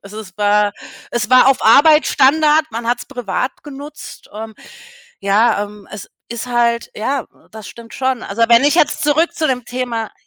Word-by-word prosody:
Also 210 +2 -9
es 190 -3 -14
war 205 0 +2 0.4
es 235 -2 -3
war 255 +1 +6
auf 270 - +1
Arbeit 300 +7 +5
Standard, 305 +3 +3
man 230 +1 -6
hat's 240 +1 -2
privat 250 0 -4
genutzt, 290 +1 -11
ähm, 220 0 -8 0.7
ja, 205 +2 +2
ähm, 205 -1 -14
es 210 - -10 0.2
ist 235 +1 -6
halt 235 -1 0
ja, 260 +4 -3 0.2
das 220 -1 -11
stimmt 235 -1 -13
schon. 260 -2 -2
Also, 215 +4 -3
wenn 235 +3 +5
ich 290 - +3
jetzt 325 -4 +1
zurück 310 +3 +1
zu 315 - -1
dem 250 -2 -2
Thema 245 -3 -4
240 Hz, 175 wpm, -17 LUFS, 215-270 Hz, 0.7 s, war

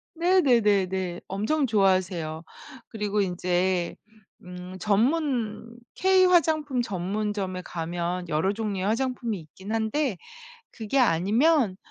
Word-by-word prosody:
네네네네. 210 - +2
엄청 260 +10 0
좋아하세요. 185 -6 +1 0.5
그리고 210 -2 -2
인제 180 -1 0 0.5
음 180 +1 -9
전문 235 0 0 0.2
K-화장품 335 -8 +3
전문점에 195 -1 -3
가면 175 +1 -4
여러 160 +6 +1
종류의 205 -3 -3
화장품이 235 -1 -1
있긴 190 +7 -9
한데 225 - -1 0.5
그게 225 +4 -2
아니면 225 - +3
205 Hz, 235 characters per minute, -26 LUFS, 185-250 Hz, 0.5 s, K-화장품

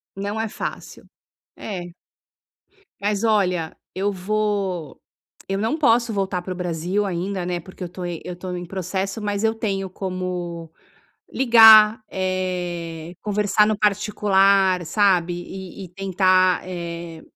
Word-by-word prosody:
Não 200 +2 -4
é 225 - -1
fácil. - - -7 0.5
É. 180 -4 -6 1.1
Mas 205 +1 0
olha, 180 -7 +1 0.2
eu 200 +2 0
vou 195 -4 -2 0.5
eu 195 - 0
não 225 +9 0
posso 235 -4 +3
voltar 190 -3 -2
para 185 - -4
o - - -10
Brasil 180 +3 -1
ainda, 185 +1 -3
né, 175 0 -2
porque 185 +2 -10
eu 175 - -5
tô 180 +1 -7
eu 175 +1 -6
tô 180 0 -6
em 175 - -5
processo, 190 +3 -3
mas 205 0 -2
eu 225 0 +2
tenho 195 -4 -2
como 180 -3 -5 0.6
ligar, 220 -3 +7
eh, 175 -3 -3
conversar 210 0 +2
no 215 - 0
particular, 195 -3 +3
sabe, 180 -1 +2
e 190 +2 -8
e - - -14
tentar, 185 0 +2
eh, 170 -2 -6
190 Hz, 130 wpm, -22 LUFS, 175-205 Hz, 1.1 s, ligar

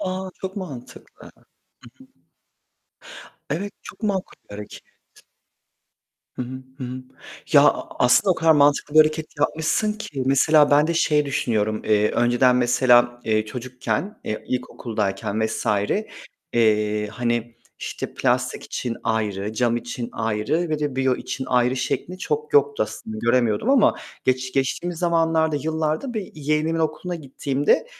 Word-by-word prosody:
A, 185 0 -3
çok 190 +1 -5
mantıklı. 140 -11 -9
Hı - - -28
hı. - - -27 2.1
Evet 195 +8 -2
çok - - -12
makul 200 -3 -2
bir - - -12
hareket. 105 0 -9 1.6
Hı - - -2
hı, 130 +1 -7 0.2
hı 130 - -5
hı. 130 +1 -6 0.5
Ya, - - +8
a - - +1
aslında 125 +11 +5
o - - -4
kadar 165 -1 +4
mantıklı 145 0 +3
bir 155 - +6
hareket 155 0 +4
yapmışsın 160 +8 +1
ki 155 -11 -5
mesela 145 +2 +5
ben 145 +1 +5
de 170 - -1
şey 150 -3 +2
düşünüyorum. 110 -5 0
Eee, 105 0 +3
önceden 120 +1 +3
mesela, 120 0 +4
eee, 110 -1 +1
çocukken, 130 - -4
eee, 110 - -4
ilkokuldayken 110 -4 -2
vs. 110 - -5 0.9
eee, 105 -2 +2
hani 120 +1 -2 0.2
işte - - -6
plastik - - 0
için 120 -2 -4
ayrı, 105 -2 -1
cam 120 +1 +1
için 120 0 -5
ayrı 115 +10 -1
ve 155 -1 -1
de 145 -3 -2
biyo 130 -1 +2
için 130 - -5
ayrı 125 +1 +2
şeklinde 180 +7 -3
çok 445 - -3
yoktu 435 +1 +3
aslında, 220 -1 -6
göremiyordum 120 - +2
ama 270 -6 +5 0.3
geç 130 0 0
geçtiğimiz 160 +6 -1
zamanlarda, 165 -2 +2
yıllarda 160 - -2
bir 210 -4 -4
yeğenimin 155 +2 0
okuluna 160 +3 -2
gittiğimde 140 - 0
135 Hz, 140 wpm, -23 LUFS, 120-160 Hz, 2.1 s, Ya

